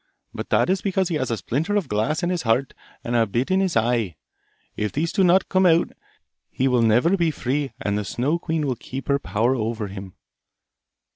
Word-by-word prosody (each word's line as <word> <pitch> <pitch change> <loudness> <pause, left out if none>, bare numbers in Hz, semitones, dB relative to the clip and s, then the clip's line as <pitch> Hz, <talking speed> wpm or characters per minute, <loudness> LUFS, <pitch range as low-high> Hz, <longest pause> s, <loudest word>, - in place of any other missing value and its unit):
But - - -6
that - - +3
is 190 +1 +1
because 190 -2 0
he 170 - -1
has 130 -4 -2
a 115 - -1
splinter 150 - -2
of 200 -7 0
glass 135 - -1
in 175 - +1
his 175 -2 -1
heart 125 +3 +1 0.3
and 120 - -2
a 115 -1 +3
bit 120 - -1
in 190 - +3
his 190 -7 +1
eye. 115 -6 +1 0.6
If 105 -1 -2
these 160 +3 -1
do 195 - +2
not 185 +1 +4
come 185 -1 +3
out, 165 0 +3 0.6
he 130 - 0
will 125 -2 +3
never 120 - +4
be 170 -3 +1
free, 140 -1 -2
and 100 0 -1
the - - -3
Snow 135 - -1
queen 160 -3 -2
will 130 -3 -1
keep 130 +3 -8
her 140 0 +3
power 115 0 0
over 110 -3 -3
him. 95 -1 -9
135 Hz, 215 wpm, -23 LUFS, 115-170 Hz, 0.6 s, not